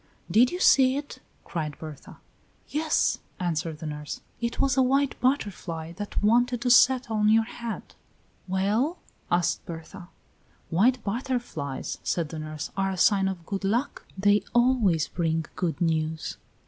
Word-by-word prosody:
"Did 245 +3 +6
you 355 - -4
see 265 -6 +5
it?" 285 0 -7 0.2
cried 155 -4 -4
Berta. 155 -3 -10 0.5
"Yes," 305 +1 +1 0.2
answered 165 -3 -2
the 160 - -8
nurse, 150 -1 -5 0.2
"it 235 0 -3
was 275 0 +2
a 265 - +4
white 275 +2 +2
butterfly 185 - -1
that 205 +4 -4
wanted 240 +3 +3
to 245 - +2
settle 245 -2 +5
on 210 0 +3
your 225 +1 +5
head." 230 0 -7 0.5
"Well?" 210 - +1 0.3
asked 175 -1 +1
Berta. 175 +2 -8 0.6
"White 225 +8 +3
butterflies," 220 - -3
said 165 -4 -1
the 160 - -6
nurse, 155 -1 -6
"are 195 0 0
a 190 - -3
sign 195 +1 +4
of 180 -3 -4
good 195 +2 -4
luck; 235 +8 -1
they 205 +1 +4
always 240 -10 +3
bring 165 -2 -1
good 165 -5 -2
news." 160 -1 -1
200 Hz, 145 wpm, -26 LUFS, 165-245 Hz, 0.6 s, Did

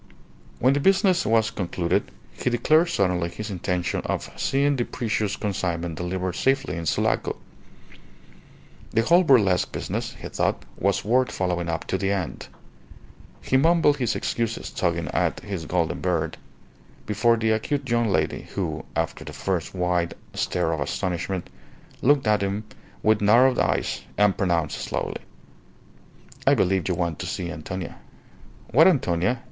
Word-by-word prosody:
When 130 +3 +3
the 145 - +1
business 190 +1 +3
was 115 0 +3
concluded 90 -4 -1 0.2
he - - -1
declared 155 +8 +3
suddenly 90 - +1
his 105 +5 -6
intention 90 -1 -1
of - - -3
seeing 140 +1 +1
the 125 - 0
precious 110 -4 -2
consignment 85 -5 -2
delivered 90 +2 -3
safely 135 -2 +1
in 85 -1 -4
Sulaco. - - 0 1.5
The 115 - +2
whole 170 +8 +5
burlesque 105 - +4
business, - - -3
he - - -6
thought, - - -1
was 100 +1 0
worth 125 +4 +2
following 90 -2 -1
up 80 0 -2
to 95 - -1
the 95 0 0
end. 95 -5 -3 1.0
He 130 - +2
mumbled 160 0 +4
his 120 -4 0
excuses, 115 -1 -2
tugging 85 -3 -1
at - - 0
his 95 -6 -5
golden 85 -3 0
beard, 85 -3 -1 0.7
before 115 +3 +2
the 110 0 +1
acute 135 +5 -1
young 120 -1 +2
lady 80 -5 0
who - - -2
(after - - -2
the - - -8
first 95 -2 -2
wide 90 -1 0 0.2
stare 90 -2 0
of 80 - -2
astonishment) 90 +5 -2 0.5
looked 140 0 +4
at 105 -2 +3
him 100 +2 -1 0.4
with 110 -1 +3
narrowed 120 +5 +5
eyes, - - 0 0.2
and 105 -2 +4
pronounced 85 -5 0
slowly - - -3 1.3
"I - - +6
believe 95 -1 +1
you 90 - +1
want 85 -3 -2
to - - -4
see 90 -1 -3
Antonia." 90 +3 -6 0.7
"What 160 +8 +7
Antonia?" 120 - +2
100 Hz, 145 wpm, -24 LUFS, 90-120 Hz, 1.5 s, What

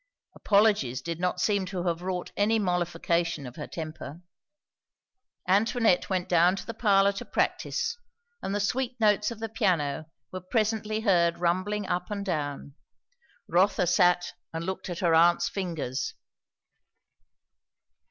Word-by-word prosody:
Apologies 200 - +2
did 165 +5 -5
not 180 0 -1
seem 200 +1 +1
to 180 -2 -4
have 170 -1 -1
wrought 180 -1 -4
any 215 +2 +2
mollification 175 -4 -1
of 125 0 -9
her 150 - -6
temper. 155 0 -7 1.2
Antoinette 210 0 +2
went 185 -2 -1
down 175 +1 +4
to - - -7
the 230 - -5
parlour 200 -3 +3
to 200 - -6
practise, 465 +1 -1 0.4
and 195 - -3
the - - 0
sweet 245 +4 -1
notes 210 -1 +3
of 235 - -7
the 225 +1 -4
piano 165 -9 0 0.2
were 185 - -6
presently 215 +2 -1
heard 170 -6 +3
rumbling 185 +4 0
up 180 -1 -2
and 200 -1 -4
down. 145 -5 -3 0.7
Rotha 185 +1 +3
sat 175 0 +3 0.2
and 165 0 -4
looked 190 0 -4
at 175 - -5
her 170 -3 +3
aunt's 170 +2 +4
fingers. 165 -9 -3
180 Hz, 140 wpm, -27 LUFS, 170-205 Hz, 1.2 s, down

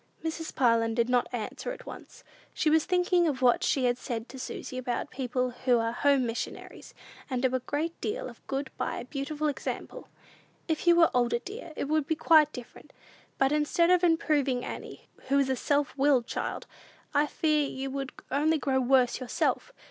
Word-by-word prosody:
Mrs. 320 0 -4
Parlin 230 -3 +3
did 235 0 +1
not 245 -1 +2
answer 245 - -4
at - - -9
once. - - -11 0.3
She 310 - +2
was 320 0 +4
thinking 360 -1 +2
of 265 -4 -2
what 245 -1 +4
she 265 -3 +1
had 245 0 +1
said 230 -1 -4
to 265 - -9
Susy 255 - -6
about 245 -1 -3
people 255 -1 -1
who 250 0 +1
are 230 0 0
"home 275 +1 +2
missionaries," 230 0 -6 0.3
and 255 -2 -1
do 260 -1 +2
a 255 - +1
great 300 +6 -3
deal - - -3
of - - -12
good 270 0 -3
by - - -2
a - - -6
beautiful 295 +3 -3
example. 300 - -5 0.6
"If 320 +1 -2
you 345 - +7
were 335 -1 +5
older, 240 -1 +2
dear, 390 - -8
it - - -2
would 305 -1 +1
be 320 - +1
quite 310 -1 +5
different. 245 -4 -11 0.4
But, 270 0 +3
instead 300 +3 +2
of 360 -1 +4
improving 290 -7 +2
Annie, - - -8 0.2
who 275 +1 +2
is 275 -1 +2
a - - +1
self 285 +3 0
willed 270 -3 +3
child, - - -4 0.5
I 295 +1 +3
fear 300 -2 +1
you 270 0 -5
would 275 -1 -4 0.2
only 305 +4 +2
grow 265 -2 0
worse 255 -1 +3
yourself. 255 - -1
275 Hz, 190 wpm, -28 LUFS, 250-310 Hz, 0.6 s, you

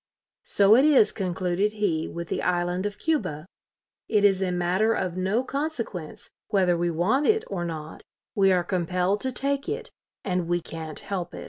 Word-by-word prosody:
"So 200 +2 +5
it 260 - +5
is," 275 -8 +5
concluded 185 +1 -1
he, 190 -7 0
"with 170 -1 -6
the - - -1
island 180 +2 0
of 205 0 -7
Cuba.... 190 - -1 0.6
It 210 -2 +3
is 195 -2 +4
a 185 -1 0
matter 180 +5 +1
of 180 -2 -2
no 190 +6 0
consequence 260 - -4 0.2
whether 185 -3 +2
we 170 0 0
want 190 - +1
it 440 0 +3
or 185 -3 -4
not; 160 -2 -6 0.3
we 195 -1 +4
are 180 -1 +3
compelled 180 +2 0
to 260 - -1
take 275 +5 -2
it, 450 +3 -4 0.3
and 180 -3 -1
we 175 0 +1
can't 160 -2 -7
help 180 -3 -4
it". - - -7
185 Hz, 180 wpm, -26 LUFS, 175-220 Hz, 0.6 s, So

